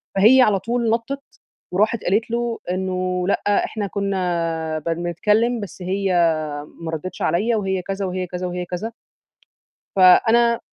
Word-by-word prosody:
فهي 225 Hz, +7 st, +6 dB
على 210 Hz, -5 st, +4 dB
طول 235 Hz, +2 st, -1 dB
نطِّت، 235 Hz, +5 st, -2 dB, 0.5 s
وراحت 210 Hz, +4 st, +1 dB
قالت 215 Hz, +5 st, 0 dB
له 235 Hz, 0 st, -1 dB
إنه: 185 Hz, -1 st, -1 dB
"لأ، 205 Hz, +1 st, +1 dB
إحنا 210 Hz, -2 st, -4 dB
كنا 170 Hz, -5 st, -2 dB
بن 165 Hz, +2 st, -2 dB
بنتكلم 210 Hz, +8 st, +1 dB
بس 200 Hz, -2 st, -8 dB
هي 190 Hz, +1 st, -1 dB, 0.7 s
ما 165 Hz, -1 st, -4 dB
ردتش 160 Hz, +3 st, -6 dB
عليَّا 205 Hz, +9 st, +1 dB
وهي 190 Hz, -2 st, -1 dB
كذا، 195 Hz, +2 st, -3 dB
وهي 185 Hz, 0 st, -3 dB
كذا، 180 Hz, +1 st, -4 dB
وهي 180 Hz, 0 st, -4 dB
كذا." 180 Hz, +6 st, -4 dB, 1.0 s
فأنا 230 Hz, +5 st, +5 dB
195 Hz, 140 wpm, -21 LUFS, 180-225 Hz, 1.0 s, فهي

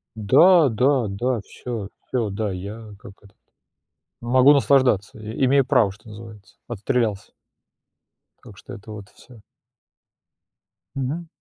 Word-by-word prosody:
Да, 165 Hz, -, +5 dB
да, 125 Hz, +2 st, +1 dB
да, 120 Hz, +4 st, -2 dB
всё, 110 Hz, 0 st, -8 dB, 0.2 s
всё, 120 Hz, -4 st, -2 dB
да, 100 Hz, +1 st, -3 dB
я 105 Hz, +4 st, -8 dB
как 100 Hz, -, -13 dB
этот, 100 Hz, -, -21 dB, 0.8 s
могу 130 Hz, +4 st, +4 dB
наслаждаться, 130 Hz, -8 st, +2 dB
и 110 Hz, +5 st, -3 dB
имею 135 Hz, +1 st, +3 dB
право, 125 Hz, -7 st, +2 dB
что 110 Hz, +3 st, -19 dB
называется, 105 Hz, -2 st, -13 dB
отстрелялся. 110 Hz, -1 st, -2 dB, 1.1 s
Так 100 Hz, -, -15 dB
что 130 Hz, -, -12 dB
это 110 Hz, 0 st, -13 dB
вот 105 Hz, -1 st, -10 dB
всё. 120 Hz, -4 st, -18 dB, 1.5 s
Мгм. 140 Hz, +6 st, -4 dB
115 Hz, 120 wpm, -22 LUFS, 105-130 Hz, 1.5 s, Да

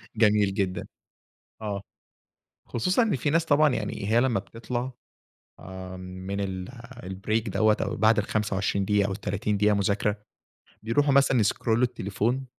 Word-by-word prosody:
جميل 105 Hz, -3 st, +3 dB
جدًا، 95 Hz, -2 st, -2 dB, 0.8 s
آه. 100 Hz, -2 st, -3 dB, 0.9 s
خصوصًا 185 Hz, -, +1 dB
إن 220 Hz, -10 st, +1 dB
في 145 Hz, +4 st, -1 dB
ناس 165 Hz, +1 st, +2 dB
طبعًا 150 Hz, 0 st, +4 dB
يعني 105 Hz, -2 st, -3 dB
هي 115 Hz, +2 st, +4 dB
لمّا 120 Hz, -6 st, +2 dB
بتطلع، 120 Hz, +4 st, -5 dB, 0.8 s
امم، 95 Hz, 0 st, -7 dB, 0.3 s
من 100 Hz, +1 st, -2 dB
ال 95 Hz, -2 st, -4 dB, 0.4 s
الbreak 105 Hz, +4 st, -2 dB
دَوَّة 110 Hz, +2 st, +3 dB
أو -, -, -2 dB
بعد 110 Hz, +1 st, +4 dB
ال25 100 Hz, -2 st, 0 dB
دقيقة 100 Hz, 0 st, +2 dB
أو 100 Hz, -, -3 dB
ال30 100 Hz, +1 st, -2 dB
دقيقة 105 Hz, +1 st, +3 dB
مذاكرة، 100 Hz, +1 st, 0 dB, 0.6 s
بيروحوا 140 Hz, +6 st, +2 dB
مثلًا 135 Hz, -3 st, +4 dB
يسكرولوا 115 Hz, +3 st, +2 dB
التليفون. 120 Hz, +4 st, -1 dB
105 Hz, 140 wpm, -26 LUFS, 100-120 Hz, 0.9 s, طبعًا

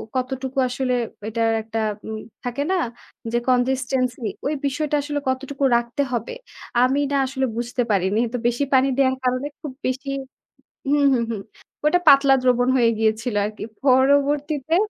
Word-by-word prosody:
কতটুকু 260 Hz, +1 st, -3 dB
আসলে 255 Hz, 0 st, -1 dB, 0.4 s
এটার 225 Hz, 0 st, +1 dB
একটা 225 Hz, 0 st, -4 dB, 0.3 s
উম 220 Hz, 0 st, -4 dB, 0.2 s
থাকে 245 Hz, +3 st, -2 dB
না -, -, +2 dB, 0.6 s
যে 240 Hz, -, +1 dB
consistency 255 Hz, -1 st, +1 dB, 0.4 s
বিষয়টা 295 Hz, +2 st, -1 dB
আসলে 290 Hz, 0 st, -3 dB
কতটুকু 275 Hz, +1 st, -3 dB
রাখতে 240 Hz, +4 st, -2 dB
হবে। 235 Hz, -, -2 dB, 0.5 s
আমি 265 Hz, +3 st, +2 dB
না 280 Hz, -, +2 dB
আসলে 265 Hz, 0 st, -1 dB
বুঝতে 245 Hz, +1 st, -2 dB
পারিনি। 195 Hz, +2 st, +1 dB
তো 245 Hz, -, 0 dB
বেশি 240 Hz, +4 st, 0 dB
পানি 265 Hz, +1 st, +5 dB
দেয়ার 265 Hz, -1 st, +3 dB
কারণে 255 Hz, +2 st, 0 dB
খুব 295 Hz, -4 st, -5 dB, 0.2 s
বেশি 265 Hz, +2 st, -3 dB, 0.8 s
হু, 285 Hz, -, +3 dB, 0.2 s
হু, 245 Hz, -, +2 dB
হু। -, -, -2 dB, 0.5 s
ওটা 355 Hz, +4 st, +4 dB
পাতলা 275 Hz, -1 st, +7 dB
দ্রবণ 245 Hz, -1 st, +3 dB
হয়ে 235 Hz, -2 st, +4 dB
গিয়েছিল 220 Hz, +1 st, 0 dB
আরকি। 210 Hz, 0 st, -6 dB, 0.2 s
পরবর্তীতে 285 Hz, +3 st, +3 dB
255 Hz, 145 wpm, -22 LUFS, 240-275 Hz, 0.8 s, পাতলা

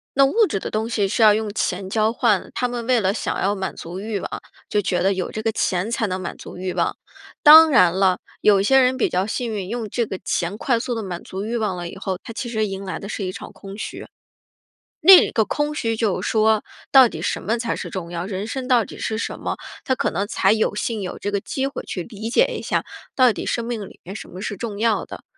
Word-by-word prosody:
那 275 Hz, 0 st, +6 dB
物 425 Hz, +10 st, +3 dB
质 195 Hz, -, -1 dB
的 -, -, -5 dB
东 220 Hz, +1 st, -2 dB
西 210 Hz, -4 st, +1 dB
是 225 Hz, +3 st, +1 dB
要 215 Hz, -1 st, +8 dB
用 215 Hz, 0 st, -1 dB
钱 190 Hz, -2 st, -2 dB
交 220 Hz, +2 st, +2 dB
换， 230 Hz, -4 st, +1 dB
他 250 Hz, -, 0 dB
们 240 Hz, -1 st, -4 dB
为 250 Hz, -2 st, +4 dB
了 190 Hz, -1 st, +1 dB
想 220 Hz, -, -3 dB
要 200 Hz, +2 st, +1 dB
满 190 Hz, -2 st, -4 dB
足 175 Hz, +3 st, -7 dB
欲 210 Hz, -1 st, -3 dB
望， -, -, -5 dB, 0.4 s
就 210 Hz, -, +1 dB
觉 180 Hz, -1 st, 0 dB
得 195 Hz, +2 st, +3 dB
有 185 Hz, -1 st, -3 dB
这 215 Hz, -, -4 dB
个 225 Hz, 0 st, 0 dB
钱 185 Hz, +2 st, 0 dB
才 230 Hz, -1 st, 0 dB
能 185 Hz, -1 st, -3 dB
满 180 Hz, -, -5 dB
足 -, -, -10 dB
欲 185 Hz, 0 st, -3 dB
望。 -, -, -1 dB, 0.4 s
当 315 Hz, +1 st, +10 dB
然 185 Hz, -, +5 dB
了， 190 Hz, -2 st, +3 dB, 0.2 s
有 205 Hz, -2 st, +5 dB
一 -, -, +1 dB
些 265 Hz, +6 st, +5 dB
人 255 Hz, 0 st, +3 dB
比 -, -, +2 dB
较 185 Hz, +1 st, 0 dB
幸 230 Hz, +2 st, -3 dB
运， 195 Hz, -3 st, -4 dB
用 230 Hz, -1 st, -4 dB
这 235 Hz, +3 st, 0 dB
个 190 Hz, -3 st, -6 dB
钱 175 Hz, +4 st, -1 dB
快 240 Hz, +1 st, +1 dB
速 245 Hz, +1 st, -3 dB
地 225 Hz, -, -3 dB
满 180 Hz, -4 st, -6 dB
足 195 Hz, +2 st, -6 dB
欲 230 Hz, +2 st, -3 dB
望 215 Hz, -5 st, -1 dB
了 175 Hz, -1 st, -5 dB
以 -, -, -10 dB
后， 190 Hz, -1 st, -3 dB
他 230 Hz, -, -9 dB
其 240 Hz, +1 st, -5 dB
实 220 Hz, -2 st, 0 dB
迎 195 Hz, 0 st, -5 dB
来 190 Hz, -, -5 dB
的 200 Hz, -, -8 dB
是 205 Hz, -1 st, -4 dB
一 185 Hz, -, -3 dB
场 -, -, -9 dB
空 195 Hz, 0 st, -10 dB
虚。 -, -, -6 dB, 1.0 s
那 370 Hz, +3 st, +8 dB
个 220 Hz, -, +2 dB
空 295 Hz, +5 st, -1 dB
虚 230 Hz, -6 st, -1 dB
就 220 Hz, -4 st, 0 dB
说， 220 Hz, -1 st, +2 dB, 0.3 s
到 265 Hz, -2 st, +8 dB
底 -, -, -7 dB
什 -, -, -2 dB
么 225 Hz, +3 st, -1 dB
才 230 Hz, 0 st, -2 dB
是 -, -, -5 dB
重 175 Hz, -3 st, -6 dB
要， 170 Hz, 0 st, -3 dB
人 195 Hz, 0 st, -4 dB
生 255 Hz, +2 st, -4 dB
到 245 Hz, -3 st, +4 dB
底 -, -, -10 dB
是 220 Hz, -, -2 dB
什 230 Hz, -, -4 dB
么， -, -, -3 dB, 0.3 s
他 260 Hz, -, +1 dB
可 -, -, -1 dB
能 200 Hz, -, -2 dB
才 195 Hz, -2 st, +2 dB
有 215 Hz, -1 st, +1 dB
幸 215 Hz, +1 st, -2 dB
有 185 Hz, -, -5 dB
这 205 Hz, -, -3 dB
个 200 Hz, -, 0 dB
机 265 Hz, +6 st, -3 dB
会 275 Hz, -, -5 dB
去 180 Hz, -, -5 dB
理 220 Hz, +2 st, -7 dB
解 -, -, +4 dB
一 -, -, -7 dB
下， -, -, -1 dB, 0.3 s
到 255 Hz, -2 st, +5 dB
底 -, -, -5 dB
生 235 Hz, -, -1 dB
命 230 Hz, -4 st, -4 dB
里 -, -, -17 dB
面 185 Hz, -, -8 dB
什 215 Hz, -, -8 dB
么 185 Hz, -, -9 dB
是 205 Hz, 0 st, -4 dB
重 215 Hz, -1 st, -5 dB
要 225 Hz, 0 st, +1 dB
的。 -, -, -10 dB
215 Hz, 285 characters per minute, -22 LUFS, 190-235 Hz, 1.0 s, 当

